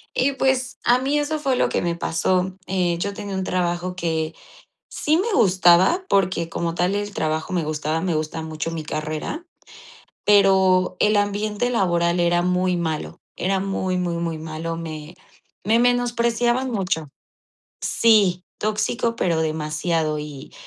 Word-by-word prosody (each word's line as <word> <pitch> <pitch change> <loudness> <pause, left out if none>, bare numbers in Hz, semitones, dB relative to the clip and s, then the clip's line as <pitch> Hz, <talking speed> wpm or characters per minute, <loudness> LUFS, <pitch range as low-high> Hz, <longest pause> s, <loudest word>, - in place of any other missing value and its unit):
Y, 275 +2 +2
pues, 265 -1 0
a 240 +1 +4
mí 275 +3 +1
eso 305 +1 -1
fue 275 -3 +1
lo - - +2
que - - 0
me 170 -1 -1
pasó. 185 +2 0
Eh, 180 -2 0
yo 200 +4 -2
tenía 200 -1 -6
un 190 - -1
trabajo 180 0 -1
que 160 -2 -2 0.6
sí 305 +1 +1
me 435 +5 -1
gustaba, 185 - +4
porque 185 -4 +1
como 165 0 -3
tal 180 +3 +1
el 205 0 -3
trabajo 155 0 -2
me 175 -3 0
gustaba, 155 +1 -2
me 175 -1 -1
gusta 155 +1 -3
mucho 160 0 -4
mi 165 -2 -5
carrera, 155 - -4 0.8
pero 190 -3 +4
el 210 0 +3
ambiente 205 +3 0
laboral 175 -5 +1
era 175 0 +3
muy 180 0 +1
malo, 160 -3 -3 0.2
era 190 +1 0
muy, 190 -1 -1
muy, 175 -2 -1
muy 170 -1 -2
malo, 160 +1 -5
me 160 0 -7 0.5
me 220 +4 +3
menospreciaban 240 +1 +1
mucho. 185 - -2 0.7
Sí, 200 -6 +3
tóxico, 215 +2 -1
pero 170 -7 +1
demasiado 155 0 -1
y, 150 -2 -9
180 Hz, 150 wpm, -22 LUFS, 165-210 Hz, 0.8 s, a